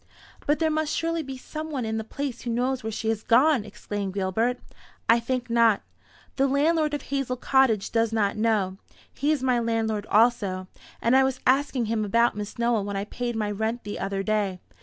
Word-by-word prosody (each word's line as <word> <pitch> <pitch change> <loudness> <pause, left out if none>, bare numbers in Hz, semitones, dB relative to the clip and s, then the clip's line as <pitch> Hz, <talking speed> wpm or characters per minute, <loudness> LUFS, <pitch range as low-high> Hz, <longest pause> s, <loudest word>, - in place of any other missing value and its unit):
"But 295 +1 +3
there 320 -1 +1
must 310 0 0
surely 330 0 -1
be 270 -3 -7
some 310 +4 -6
one 265 -6 -3
in 220 0 -2
the - - -3
place 265 +2 -5
who 245 - -5
knows 250 +2 0
where 220 - -2
she 220 +1 -2
has 220 -1 -1
gone!" 255 +2 +4
exclaimed 205 -2 -5
Gilbert. 220 +6 0 0.5
"I 230 +1 +6
think 245 +1 -2
not. 230 -3 +3 0.5
The 275 0 +3
landlord 300 +2 +2
of 290 - -5
Hazel 275 -2 -2
Cottage 255 -5 +2
does 225 -1 +1
not 210 -3 +1
know. 210 -4 +1 0.4
He 290 +2 0
is 290 -4 0
my 250 -2 +2
landlord 225 -2 -1
also, 205 -5 +2 0.4
and 235 +3 +4
I 265 - +6
was 265 -1 -1
asking 265 -2 +2
him 220 0 0
about 230 +3 +2
Miss 210 0 -6
Nowell 235 -3 +1
when 200 0 -4
I 200 - -2
paid 240 +2 -4
my 210 -2 -1
rent 220 +3 -2
the 205 - -5
other 195 0 -2
day. 205 -3 0
235 Hz, 200 wpm, -26 LUFS, 215-265 Hz, 0.5 s, I